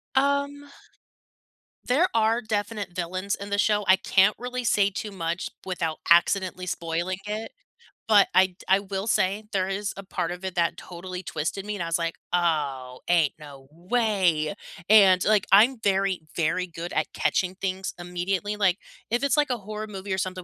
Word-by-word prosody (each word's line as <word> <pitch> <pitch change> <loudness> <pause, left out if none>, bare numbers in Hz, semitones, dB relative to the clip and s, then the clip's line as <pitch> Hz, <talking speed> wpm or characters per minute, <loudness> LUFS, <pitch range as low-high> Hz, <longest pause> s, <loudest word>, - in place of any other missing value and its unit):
Um, 280 +1 +1 1.2
there 300 +9 +3
are 225 +1 +2
definite 205 -3 -3
villains 185 +3 -2
in 200 0 -8
the 200 - 0
show. 210 -1 +2
I 190 - +7
can't 195 +2 +3
really 250 0 -4
say 200 -3 +3
too 210 +2 -5
much 170 -2 -3 0.2
without 165 -4 -2
accidentally 185 +1 +3
spoiling 170 +1 -2
it, 215 +2 -4 0.6
but 205 -3 +6
I 190 0 +6
d 180 - -23
I 190 +1 +5
will 195 +1 -4
say 200 +1 +1
there 190 -1 0
is 200 +2 -2
a 195 - -7
part 180 -3 -3
of 180 +1 -8
it 190 -1 -4
that 170 -1 +1
totally 180 +1 -8
twisted 170 +6 -3
me, 210 - -3
and 185 - -3
I - - -3
was 165 0 0
like, 165 0 -2 0.2
"Oh, 145 -7 -1
ain't 170 -5 +3
no 140 -3 -12
way!" 185 -3 +1 0.3
And, 195 -4 +6
like, 210 -2 +3
I'm 230 +6 +6
very, 195 -2 +1 0.2
very 180 +3 0
good 170 +1 -7
at - - -1
catching 185 0 0
things 190 0 -3
immediately, 180 +3 -2
like, 190 -2 +2 0.3
if 240 +3 0
it's, 280 - +2
like, 295 -2 +2
a 245 - 0
horror 215 +1 -6
movie 195 -1 -6
or - - -3
something- 185 0 -3
190 Hz, 180 wpm, -25 LUFS, 175-210 Hz, 1.2 s, I